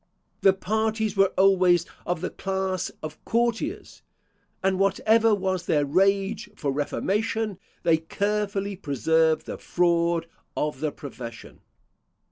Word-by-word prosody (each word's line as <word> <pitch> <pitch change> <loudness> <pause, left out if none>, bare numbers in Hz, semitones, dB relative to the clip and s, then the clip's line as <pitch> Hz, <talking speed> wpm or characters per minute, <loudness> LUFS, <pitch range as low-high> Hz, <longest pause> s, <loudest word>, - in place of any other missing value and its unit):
The 195 - +6
parties 220 +2 -1
were 195 -1 +4
always 185 -3 +4 0.2
of 175 -2 -1
the 185 - -3
class 190 -1 -2
of 155 0 -7
courtiers; 240 - -1 0.6
and 190 0 +1
whatever 220 +3 +3
was 185 -2 -2
their 145 -2 +2
rage 195 +7 +1
for 140 - -2
reformation, 205 +8 -1 0.2
they 165 -2 +4
carefully 200 +3 -2
preserved 160 - +1
the - - -6
fraud 170 -1 +1 0.3
of 150 0 -1
the 155 -1 -1
profession. 120 -5 -9
190 Hz, 115 wpm, -25 LUFS, 165-205 Hz, 0.6 s, The